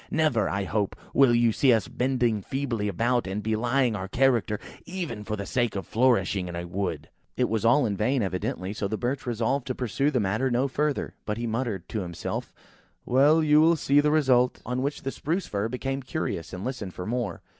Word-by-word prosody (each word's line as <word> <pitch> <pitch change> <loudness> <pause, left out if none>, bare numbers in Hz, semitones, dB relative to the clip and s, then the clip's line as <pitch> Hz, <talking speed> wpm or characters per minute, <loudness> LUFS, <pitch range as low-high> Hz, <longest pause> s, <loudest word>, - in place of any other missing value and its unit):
Never, 155 -8 +2
I 100 0 -1
hope, 100 0 -1 0.2
will 130 -4 +5
you 120 -1 +4
see 130 +4 +3
us 115 -3 +2
bending 125 -4 0
feebly 120 -3 -2
about, 115 +4 0
and 100 +2 -3
belying 120 +2 +1
our 95 -1 -4
character, 115 -2 +2 0.2
even 170 - -5
for 105 +1 -3
the 100 -1 -5
sake 120 0 0
of 95 - -3
flourishing 105 -6 +2
in 85 - -6
a 85 0 -4
wood!" 85 -4 -3 0.3
It 125 - +2
was 110 -1 -1
all 120 +4 +4
in 105 -3 -1
vain, 120 +5 +1
evidently; 95 +1 -3
so 105 -2 -2
the 110 +2 -3
Birch 125 +3 -3
resolved 120 +3 -1
to 130 - -2
pursue 130 +4 0
the 135 -4 +1
matter 110 +6 0
no 125 +3 +1
further, 150 +2 -1
but 105 0 -3
he 120 - -3
muttered 115 -5 -2
to 110 - -2
himself–"Well, 130 - -1
you 150 0 +5
will 165 +1 +5
see 145 -2 +3
the 150 +1 +3
result." 130 -5 +3
On 125 +1 -2
which 140 +2 -3
the 135 - -2
Spruce 170 +7 -2
fir 100 +2 -2
became 135 +2 -3
curious, 130 - -4
and 90 +2 -6
listened 115 -8 -5
for 90 - -5
more. 115 -4 -3
120 Hz, 205 wpm, -26 LUFS, 105-135 Hz, 0.3 s, will